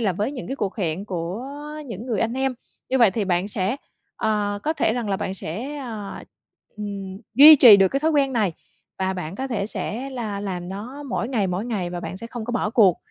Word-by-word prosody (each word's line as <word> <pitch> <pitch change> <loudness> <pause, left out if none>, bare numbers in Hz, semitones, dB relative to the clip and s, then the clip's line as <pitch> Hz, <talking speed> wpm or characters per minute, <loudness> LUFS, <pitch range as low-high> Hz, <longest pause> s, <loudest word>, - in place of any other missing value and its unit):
là 205 -5 +1
với 210 +9 -2
những 255 - -6
cái 270 - -4
cuộc 200 -6 -3
hẹn 180 -2 -2
của 185 +3 -4 0.4
những 230 0 -7
người 225 -5 -1
anh 225 +1 +1
em. 265 0 0 0.3
Như 265 +1 +1
vậy 230 -4 +6
thì 210 +2 -1
bạn 185 +1 0
sẽ 200 +4 -1 0.4
ờ, 210 -2 0
có 315 - +1
thể 290 -8 +1
rằng 240 -3 -2
là 195 - +1
bạn 190 0 -3
sẽ, 230 - -5
ờ, 225 -7 -6 0.5
ừm, 200 -2 -6 0.2
duy 300 +4 +11
trì 235 -7 +10
được 195 -1 +5
cái 275 - -1
thói 320 +2 +2
quen 280 -3 +2
này, 210 -7 +1 0.5
và 190 0 0
bạn 180 -2 -5
có 265 +6 -3
thể 210 -4 -1
sẽ 250 +4 -4
là 220 -6 -4
làm 180 -3 -4
nó 230 +9 -7
mỗi 245 -4 -2
ngày, 225 -7 +1
mỗi 185 +3 -2
ngày, 195 -7 -2
và 175 0 -4
bạn 170 +2 -6
sẽ 230 - -7
không 235 -1 -6
có 240 - -4
bỏ 235 -3 0
cuộc. 200 -7 +5
210 Hz, 235 wpm, -23 LUFS, 190-250 Hz, 0.5 s, duy